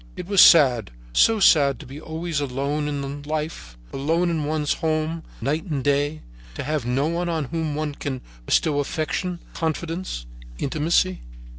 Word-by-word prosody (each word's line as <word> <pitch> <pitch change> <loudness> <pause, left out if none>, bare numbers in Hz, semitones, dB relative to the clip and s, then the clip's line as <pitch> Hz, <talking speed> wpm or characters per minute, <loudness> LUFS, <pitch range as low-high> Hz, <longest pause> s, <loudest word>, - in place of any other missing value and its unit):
It - - -6
was 200 0 +5
sad, 125 - +7 0.2
so 225 - +4
sad 140 - +5
to - - -10
be 140 +4 -9
always 160 -1 -3
alone 140 +2 -2
in 140 0 -4
life, 150 - -4 0.2
alone 165 +6 +1
in 155 -3 -1
one's 150 -1 0
home, 160 0 -1 0.2
night 155 +4 -1
and 145 -7 -2
day, 145 +2 0 0.3
to - - -4
have 150 -5 -2
no 130 +3 +1
one 170 +1 -1
on 160 -2 -1
whom 155 +1 -3
one 150 -1 -2
can 135 -2 -4 0.3
bestow 150 -3 +2
affection, 165 +5 -2
confidence, 165 - -3 0.3
intimacy. 165 +6 +1
155 Hz, 155 wpm, -23 LUFS, 140-165 Hz, 0.3 s, sad